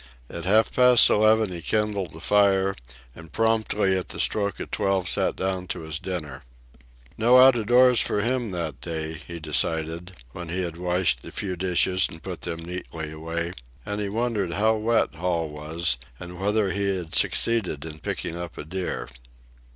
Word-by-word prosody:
At 85 0 -6
half 110 +4 +3
past 125 -1 +7
eleven 110 -1 +4
he 85 -2 -6
kindled 100 -4 -1
a - - -9
fire, 95 0 +3 0.4
and 80 -1 -12
promptly 110 -3 +1
at 95 - -3
the - - -6
stroke 100 -2 0
of - - -6
twelve 95 -2 0
sat - - +1
down 95 -1 -2
to - - -4
his 80 0 -5
dinner. 75 -8 -6 0.8
No 120 +3 +6
out 130 0 +8
of 110 -3 -2
doors 125 0 +6
for 105 - 0
him 120 0 -1
that 85 -7 -4
day, 80 -2 -4
he 85 +2 -9
decided, 80 +3 -1 0.2
when 85 +4 -8
he 90 +3 -2
had 85 -2 -5
washed 90 -8 +1
the - - -10
few 95 -2 -3
dishes 90 +1 +2
and 80 -1 -11
put 90 -3 -6
them 85 -1 -4
neatly 80 -2 -6
away; 80 +2 -4 0.3
and 105 +1 -3
he 100 - -2
wondered 110 -5 -1
how 110 +4 +2
wet 110 +2 +1
Hall 85 -1 -1
was 75 -2 -1 0.2
and 85 0 -9
whether 100 0 +1
he 100 0 0
had 85 -3 -7
succeeded 100 -11 +2
in 80 -1 -8
picking 85 - -4
up 85 -1 -7
a - - -5
deer. 90 +3 -4
90 Hz, 180 wpm, -25 LUFS, 85-105 Hz, 0.8 s, out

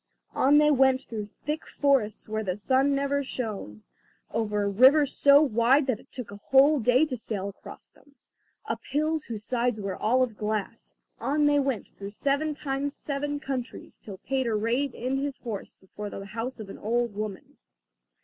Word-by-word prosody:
On 285 +3 +4
they 300 0 +5
went 265 -1 +3
through 210 -2 -6 0.2
thick 300 +2 -3
forests 270 -8 +1
where 220 0 -2
the 185 -2 -2
sun 265 +6 +2
never 280 0 0
shone, 215 - -5 0.5
over 210 -2 0
rivers 265 +8 +5
so 285 +1 +6
wide 260 +2 +3
that 255 -5 -1
it - - -20
took 245 -6 -7
a 200 - -8
whole 280 +3 +6
day 250 +5 +4
to 280 -5 -4
sail 205 -4 -4
across 200 - -12
them, 285 -1 -25 0.5
up - - -3
hills 310 +1 0
whose 220 -3 -6
sides 245 0 0
were 195 -2 -3
all 255 +4 +2
of 230 -4 -4
glass; 215 -1 -4 0.2
on 295 +2 +1
they 290 0 +4
went 270 -5 -1
through 200 0 -5
seven 285 +7 -1
times 280 0 -3
seven 290 0 -3
countries 265 -4 -6
till 200 -3 -9
Peter 250 0 -1
reined 240 +5 0
in 255 +3 -2
his 275 0 -3
horse 220 -5 -7
before 205 +2 -8
the 195 0 -7
house 230 +5 -5
of 210 -3 -8
an - - -9
old 235 +1 0
woman. 205 -1 -6
255 Hz, 180 wpm, -27 LUFS, 215-280 Hz, 0.5 s, so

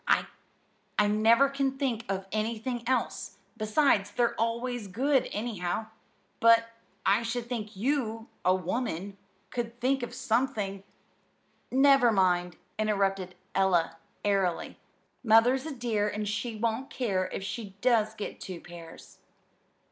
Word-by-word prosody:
I 210 - +5
never 225 +6 +5
can 275 -1 -1
think 245 -5 -1
of 195 -1 -2
anything 225 +3 -2
else. 260 - -1 0.2
Besides, 215 -1 +2
they're 235 +3 +1
always 235 0 -2
good, 265 +8 +1
anyhow. 215 -1 -3 0.5
But 230 0 +5 0.4
I 200 +4 +4
should 235 +1 -3
think 220 -4 -4
you, 225 -1 -1 0.2
a 185 - +4
woman, 195 -1 -3 0.3
could 240 -1 -4
think 265 +2 +1
of 240 0 -5
something 220 -6 -1 0.5
" - - -40
"Never 270 -2 +6
mind," 180 -3 +2 0.2
interrupted 195 -3 0 0.2
Ella 185 -4 +2 0.3
airily. 195 -4 0 0.4
"Mother's 245 +5 +4
a - - -4
dear, 220 -4 0
and 210 0 -3
she 215 +3 -2
won't 230 +5 -1
care 195 -7 -1
if - - -4
she 195 0 -6
does 220 -3 +3
get 210 - -6
two 185 -3 -6
pairs." 170 -2 -12
220 Hz, 125 wpm, -29 LUFS, 195-245 Hz, 0.5 s, Never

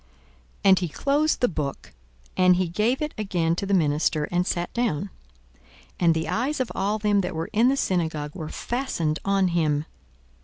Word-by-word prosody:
42:004:020 - - -33 0.6
And 190 - +6
he 175 -3 -2
closed 290 - +1
the 245 - +4
book, 150 - -5 0.4
and 185 -1 +5
he 185 0 0
gave 225 - 0
it 300 - -4
again 175 -5 0
to 195 - -3
the 200 - 0
minister, 150 -2 +1
and 175 +1 +1
sat 175 -1 -2
down. 205 -6 -1 0.9
And 170 -2 +4
the 160 0 -2
eyes 245 - -1
of 255 - -1
all 205 +3 0
them 205 -1 +2
that 180 -2 -4
were 160 +1 -4
in 225 +3 +4
the 275 - +1
synagogue 160 - -1
were 160 -4 -6
fastened 205 - -2
on 195 -2 +2
him. 155 -3 +1
185 Hz, 185 wpm, -25 LUFS, 160-215 Hz, 0.9 s, And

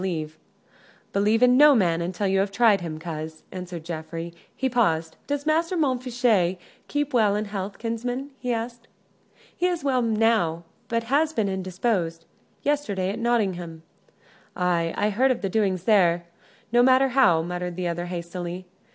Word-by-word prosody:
"Believe 210 +4 +2
in 250 0 +6
no 295 0 +8
man 170 -6 +2
until 180 +4 -2
you 195 0 +2
have 195 +1 +1
tried 210 -2 +3
him, 160 -2 -5
coz," 155 -1 -7
answered 180 -3 -7
Geoffrey. 165 0 -6 0.2
He 265 - 0
paused. 165 -10 +1
"Does 285 0 -2
Master 330 +3 +1
Montfichet 245 - +1 0.3
keep 290 -1 -2
well 215 -4 +3
in 210 +1 -1
health, 200 -1 -5
kinsman?" 245 +4 -4
he 250 - -2
asked. 235 0 -4 0.7
"He 360 - +1
is 350 -4 -2
well, 260 -3 +2
now, 220 -7 +1 0.2
but 230 0 -1
has 295 +6 +1
been 220 -6 0
indisposed.... 185 -3 -2 0.4
Yesterday 210 -11 0
at 220 - -5
Nottingham 185 -9 -1 0.4
" - - -30
"Ay, 175 -2 +1
I 210 - +1
heard 255 +6 +2
of 255 - -1
the 195 - 0
doings 190 -3 0
there 175 -5 +3 0.5
no 240 +1 +5
matter 260 +1 +5
how," 180 -11 +4
muttered 180 0 -4
the 180 0 -2
other, 175 +1 -3
hastily. 175 +1 -5
205 Hz, 160 wpm, -25 LUFS, 175-245 Hz, 0.7 s, no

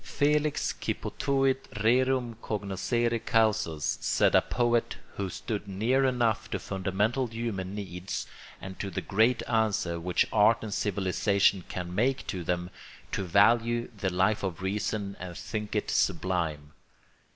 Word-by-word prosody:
Felix 150 +1 +1
qui - - -2
potuit 135 -1 0
rerum 125 +1 +2
cognoscere 115 +3 -1
causas, 110 -9 +1
said - - +3
a - - +6
poet 120 -1 0 0.2
who 100 -2 -2
stood 105 +1 -4
near 115 +8 +1
enough 120 -4 +1
to - - -1
fundamental 100 +7 -1
human 110 -5 -4
needs 95 -2 -5 0.3
and 95 0 -9
to 100 - -3
the 90 - -3
great 110 +5 +2
answer 105 -7 +1
which 90 0 +1
art 105 +1 +5
and 105 -2 -4
civilisation 100 -1 +1
can 90 -1 -5
make 125 +7 +1
to 90 -2 -4
them, 90 +1 -2 0.4
to - - -1
value 115 +6 +3
the 100 -2 -1
Life 95 +4 +1
of 95 -2 -4
Reason 100 0 -2
and 90 -1 -7
think 105 -1 -4
it 105 - -1
sublime. 85 -5 0
105 Hz, 140 wpm, -28 LUFS, 95-115 Hz, 0.4 s, a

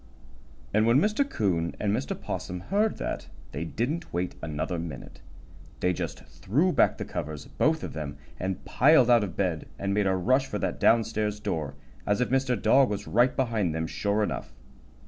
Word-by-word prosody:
And 110 +2 +3
when 120 +2 +5
Mr. 215 - +2
'Coon 85 - 0
and 105 0 +1
Mr. 70 - -3
'Possum 90 0 -4
heard 205 - 0
that 75 0 -4 0.2
they 75 +4 -4
didn't 140 - -3
wait 90 +1 -2
another 80 +2 -3
minute. 80 -5 -8 0.6
They 90 - +2
just - - -5
threw 150 - 0
back - - +3
the - - -4
covers, 75 -1 -5
both 160 +1 0
of - - -5
them, 75 -2 -5 0.2
and 95 0 -3
piled 130 -3 +5
out 120 -3 +6
of 95 -4 -5
bed 90 -6 -1
and 100 0 -1
made 105 -1 +2
a 95 - +2
rush 130 +9 +2
for 105 - -3
that - - -2
down 115 0 +5
stairs 105 -1 -2
door, 75 -8 -3 0.3
as 105 +2 +2
if 125 - +1
Mr. 130 -3 +1
Dog 130 +6 +5
was 105 -1 -3
right 125 +3 +3
behind 110 -10 0
them, 80 0 -1
sure 100 +5 0
enough. - - -3
105 Hz, 185 wpm, -27 LUFS, 85-125 Hz, 0.6 s, out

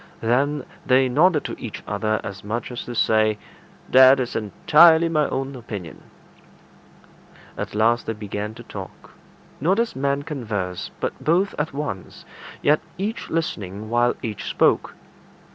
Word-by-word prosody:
Then 135 +5 +1 0.2
they 130 0 +4
nodded 155 +4 +3
to - - -6
each 115 - -7
other 110 +1 -1
as 95 -1 -7
much 115 +5 -4
as 120 - -6
to 120 - -6
say, 110 -1 +3 0.5
"That 130 +1 +7
is 125 -2 -3
entirely 160 +10 +5
my 155 -3 +1
own 135 +1 -3
opinion." 105 -9 -8 1.5
At - - -5
last 115 +2 +2
they 115 - -1
began 105 0 -5
to - - -11
talk; - - -10 0.5
not 180 +8 +2
as 235 -1 0
men 140 +1 0
converse, 105 - -4
but - - -4
both 180 +5 +2
at 150 +2 -1
once, 140 -10 -6 0.4
yet 150 +1 +4 0.2
each 205 +3 -4
listening 110 - -3
while 120 +1 +2
each 110 -4 -4
spoke. - - +2
125 Hz, 145 wpm, -23 LUFS, 110-150 Hz, 1.5 s, That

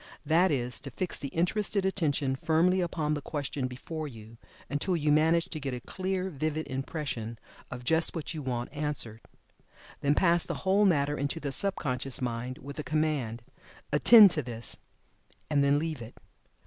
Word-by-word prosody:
That 170 +4 +4
is, 125 -4 -1
to 135 - -7
fix 180 +8 -2
the 140 - -4
interested 190 +5 0
attention 145 -8 0
firmly 170 +6 +2
upon 160 -3 -1
the 145 - -2
question 140 -2 -3
before 155 +5 -6
you, 115 -3 -12 0.3
until 145 +6 -1
you 150 -1 +1
manage 160 +3 +4
to 155 - -4
get 135 -3 -3
a - - -5
clear, 190 +6 -3
vivid 155 +1 -2
impression 130 -4 -4 0.3
of 125 -1 -7
just 160 +7 +3
what 165 0 -4
you 155 - -5
want 125 -1 -3
answered. 145 -7 -2 0.8
Then 145 +1 +2
pass 170 0 +3
the - - -4
whole 195 +2 +4
matter 145 -5 +2
into 140 +4 -1
the 145 -3 -3
sub 200 +7 +1
conscious 130 -2 -2
mind 125 +1 -3
with 140 +2 -9
the 150 - -3
command 145 -6 -1 0.5
"Attend 205 +6 +9
to 150 - -1
this," 120 -3 -4 0.7
and 145 -2 +3
then 140 +1 +4
leave 155 -3 -3
it. 115 +1 -10
150 Hz, 175 wpm, -29 LUFS, 130-165 Hz, 0.8 s, Attend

